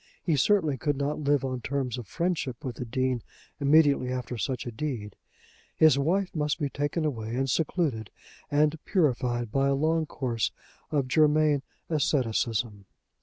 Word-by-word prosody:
He 165 - +2
certainly 155 -2 +2
could 145 +2 -1
not 145 +2 -1
live 145 -2 +1
on 130 -1 -3
terms 130 -1 -2
of 120 - -8
friendship 170 -9 -2
with 125 -3 -4
the 125 - -4
Dean 130 +1 -1 0.4
immediately 140 -3 +4
after 125 -1 -3
such 125 +2 -3
a 120 - -4
deed. 115 -5 -4 0.6
His 155 -3 +5
wife 180 +7 0
must 150 -2 0
be 145 -3 -1
taken 145 +4 -1
away 115 -5 -3
and 135 +1 0
secluded, 135 - 0 0.4
and 150 +2 +2
purified 125 - 0
by 135 +2 +2
a 140 - +2
long 160 +2 +1
course 120 -7 -1 0.4
of 140 -4 0
Germain 150 0 +3 0.3
asceticism. 115 -8 0
140 Hz, 155 wpm, -28 LUFS, 125-155 Hz, 0.6 s, His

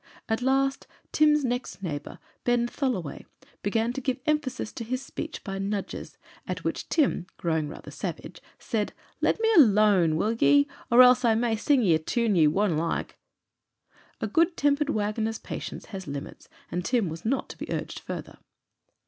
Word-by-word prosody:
At 220 +1 0
last 270 +1 +1 0.2
Tim's 300 -2 +4
next 245 -5 -3
neighbour, 145 -5 -5 0.3
Ben 240 -1 +2
Tholoway, 240 - -3 0.3
began 225 +3 0
to 270 - -4
give 260 0 -1
emphasis 295 -7 -1
to - - -5
his 255 +3 -3
speech 315 - -6
by 195 -2 -4
nudges, 200 0 -4 0.3
at - - -4
which - - -3
Tim, 275 - +1
growing 160 -3 -1
rather - - -10
savage, - - -6 0.2
said, 215 -3 -2 0.3
"Let - - +2
me 450 - +2
alooan, 205 - +5
will 215 +8 +1
ye? 145 -9 +4 0.2
else 250 +1 +7
I'll 230 -2 +4
ma' 235 +1 +1
ye 225 - +1
sing 260 +3 +2
a 165 -6 +4
toon 225 +6 0
ye 160 -3 +5
wonna 180 +1 +1
like." 165 +1 -2 1.0
A - - -1
good 330 - +2
tempered 290 +1 +2
wagoner's 220 -1 -1
patience - - -7
has 190 -3 -6
limits, 140 0 -7 0.2
and 180 - -2
Tim 235 -2 +1
was 160 +1 -6
not 260 +5 0
to - - -9
be - - -6
urged - - -3
further. - - -7
225 Hz, 165 wpm, -27 LUFS, 185-260 Hz, 1.0 s, else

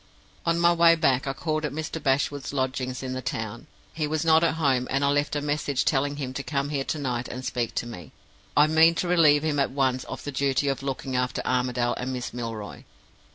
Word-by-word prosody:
"On 170 0 +3
my 170 0 +5
way 170 0 +6
back, 135 -5 +1
I 135 - -1
called 155 +2 -2
at 150 - -2
Mr. 160 +1 -5
Bashwood's 140 0 0
lodgings 130 -1 -2
in 130 -1 -3
the 130 - -4
town. 115 +4 -5 0.3
He 155 -1 -1
was 155 +1 -1
not 160 0 +5
at 165 - +2
home, 135 -5 +1
and 135 +1 +1
I - - +3
left 145 +1 0
a 145 - 0
message 145 -2 -1
telling 145 +1 +1
him 135 -3 -5
to 140 - -3
come 140 0 -2
here 140 -2 -1
to - - -2
night 125 -4 -2
and 130 +1 -7
speak 120 -2 -2
to - - -1
me. 90 -9 -9 0.5
I 145 - +7
mean 160 +2 +5
to 180 - -1
relieve 155 -4 +5
him 150 -2 0
at 140 - +2
once 130 -2 0
of - - -7
the 145 - -4
duty 140 +1 +1
of 135 - -2
looking 135 -1 -4
after 125 0 -1
Armadale 125 -1 0
and 125 +1 -3
Miss 125 -2 -4
Milroy. 115 -4 -6
140 Hz, 230 wpm, -26 LUFS, 130-150 Hz, 0.5 s, I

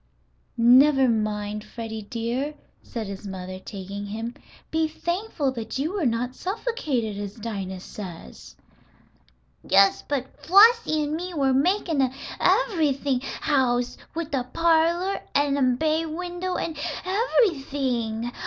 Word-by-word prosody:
"Never 260 +3 +6
mind, 210 -2 -1
Freddie 225 -1 -6
dear," 240 +7 -3 0.3
said 230 -3 -5
his 200 +1 -7
mother, 185 -1 -6
taking 200 +1 -7
him. 225 +3 -4 0.4
"Be 320 0 +2
thankful 345 -2 -2
that 230 -1 -5
you 305 +7 -1
were 365 -9 +1
not 240 +2 -1
suffocated, 305 - -2
as 205 0 -5
Dinah 195 -5 -5
says." 165 - -9 1.1
"Yes, 195 +1 +5
but 265 -2 -3
Flossie 400 -4 +6
and 295 +1 -2
me 350 +2 -4
were 270 -3 +2
makin' 325 +1 +2
an 260 -1 +1 0.3
ev'rything 310 - +2 0.2
house, 250 -4 +1 0.2
with 325 -2 -4
a 265 -3 +1
parlor, 335 +5 +2
an' 285 0 +3
a 255 -3 +2
bay 315 +2 +1
window, 355 +3 -4
an' 325 - -3 0.3
ev'rything. 275 - 0
270 Hz, 125 wpm, -25 LUFS, 225-325 Hz, 1.1 s, Never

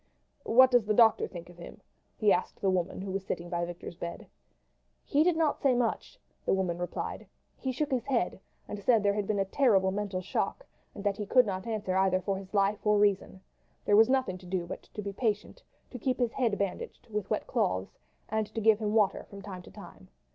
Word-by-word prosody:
"What 260 +3 +7
does 245 -3 +4
the 215 0 +1
doctor 225 -1 +5
think 175 -2 -9
of 175 0 -15
him?" 170 - -10 0.4
he 210 -2 +4
asked 180 - -2
the 195 - +2
woman 185 0 -1
who 195 0 -5
was 195 0 -2
sitting 175 -2 -5
by 175 0 0
Victor's 175 0 -8
bed. 170 0 -7 0.8
"He 295 +1 +3
did 345 -1 +2
not 315 -3 +1
say 265 -3 +3
much," 240 -2 -1 0.3
the - - +2
woman 180 -3 -1
replied. 175 - -4 0.3
"He 260 - -3
shook 290 +3 -2
his 250 -3 0
head, 235 -9 0 0.3
and 205 - -5
said 225 -2 +4
there 200 0 +3
had 205 -1 -2
been 215 - 0
a 195 - +1
terrible 195 -4 +3
mental 200 -1 -2
shock, - - -2 0.3
and 200 - -7
that 205 -1 0
he 210 - -4
could 250 +2 +5
not 190 0 -4
answer 210 -4 -2
either 190 -1 +3
for 195 +1 -2
his 190 -1 -12
life 200 0 +1
or 210 -1 +3
reason. 200 -2 +1 0.4
There 205 - +4
was 220 +2 +6
nothing 260 -9 +1
to 180 - -13
do 180 -1 -2
but 170 - -7
to 210 - -4
be 200 0 -4
patient, 215 - -2 0.3
to 250 - -7
keep 255 +1 0
his 245 -3 +1
head 235 -6 +1
bandaged 200 -2 -4
with 210 -2 -3
wet - - -1
cloths, - - -1 0.3
and 220 -1 -1
to - - 0
give 220 -1 +4
him 215 -1 -1
water 210 -3 +2
from 200 -1 -10
time 190 -3 -7
to - - -14
time. - - -13
205 Hz, 225 wpm, -30 LUFS, 190-230 Hz, 0.8 s, What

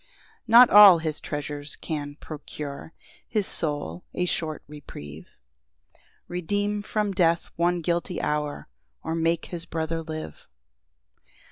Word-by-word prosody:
] - - -30
3 - - -7
Not 240 +1 +9
all 205 -3 +10
his 160 -2 -3
treasures 145 0 -5
can 145 -2 -5
procure 150 -1 -8 0.4
His 210 -3 0
soul 145 - -2
a 180 - 0
short 160 -3 -3
reprieve, 80 - -10 1.0
Redeem 205 +4 -1
from 210 -1 -1
death 170 -3 +1
one 175 +1 +1
guilty 175 +2 -1
hour, 150 -1 -2 0.4
Or - - -3
make 165 0 0
his 170 -1 -4
brother 165 0 -2
live. 155 - -8
165 Hz, 125 wpm, -25 LUFS, 150-180 Hz, 1.0 s, all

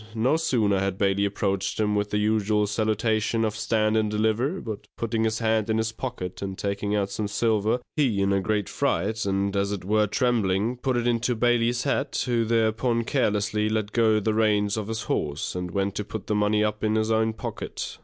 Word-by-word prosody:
No 125 +7 +2
sooner 110 -11 +1
had 95 -1 -1
Bailey 100 0 +2
approached 100 -1 -1
him 105 -1 +1
with 105 0 0
the 105 - 0
usual 105 0 +2
salutation 110 +1 0
of 110 -1 -2
Stand 110 -1 +1
and 110 -1 +2
Deliver, 110 - 0
but 110 -3 -7
putting 115 -1 -1
his 110 0 0
hand 110 -1 +1
in 110 - +2
his 110 0 0
pocket, 110 -7 -6
and 95 -1 -4
taking 100 +1 -2
out 100 -1 -1
some 105 +1 -2
silver, 110 +2 +1 0.2
he, 130 -10 +1
in 100 0 +2
a 100 - +2
great 105 0 -1
fright, 105 +6 -1
and 100 +1 0
as 100 0 0
it 100 -3 -4
were 105 +1 +2
trembling, 115 -1 +1
put 125 0 -1
it 120 - -1
into 120 0 +1
Bailey's 120 +1 +2
hat, 140 0 -1
who 120 -3 +1
thereupon 115 +1 +1
carelessly 105 -4 0
let 110 -1 -1
go 110 -2 +3
the 110 +1 0
reins 105 -2 +2
of 110 -2 -3
his 110 0 -3
horse, 75 +1 -2
and 90 -1 -4
went 100 +2 -1
to 105 - -3
put 105 0 -7
the 110 - -1
money 105 0 +2
up 105 0 -2
in 110 0 +1
his 110 0 +1
own 110 0 +2
pocket. - - -6
110 Hz, 205 wpm, -25 LUFS, 100-115 Hz, 0.2 s, go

